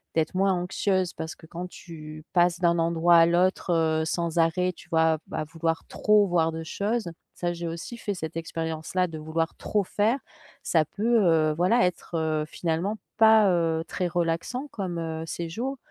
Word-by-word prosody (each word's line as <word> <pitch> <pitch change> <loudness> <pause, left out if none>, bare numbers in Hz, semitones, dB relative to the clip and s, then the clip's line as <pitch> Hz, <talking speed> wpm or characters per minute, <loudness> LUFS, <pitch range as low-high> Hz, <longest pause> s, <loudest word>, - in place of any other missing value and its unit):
d'être 160 -1 +1
moins 195 +1 +3
anxieuse. 185 0 0
Parce 160 0 -6
que - - -16
quand 175 +2 -6
tu 155 -3 -10
passes 175 -1 +3
d'un 170 -1 +2
endroit 170 +1 +3
à 165 - +7
l'autre, 180 +2 +1
heu, 160 -1 +2
sans 170 +1 -1
arrêt 180 +3 +2
tu 170 - -16
vois, 160 -1 +3
à - - -1
v - - -24
à - - -1
vouloir 165 +1 -2
trop 210 -1 +3
voir 165 -2 +2
de 165 0 -5
choses, 205 +4 -2 0.3
ça 175 -1 -2
j'ai 170 0 -5
aussi 165 +8 -6
fait 205 -3 -3
cette 160 -3 -6
expérience 160 0 -4
là 185 0 +4
de 165 -2 -7
vouloir 160 +1 -2
trop 210 -1 -1
faire, 210 +6 +1 0.5
ça 160 -2 +3
peut, 225 +7 +1
heu, 160 -3 +3
voilà, 185 +8 +3
être, 180 -1 -3
heu, 155 -1 0
finalement 170 +6 -2 0.2
pas, 220 -1 +7
heu, 165 -2 +1
très 180 - -2
relaxant 175 - -2
comme, 185 -4 -4
heu, 160 -1 -4
séjour, 220 +13 -4
170 Hz, 190 wpm, -26 LUFS, 160-185 Hz, 0.5 s, à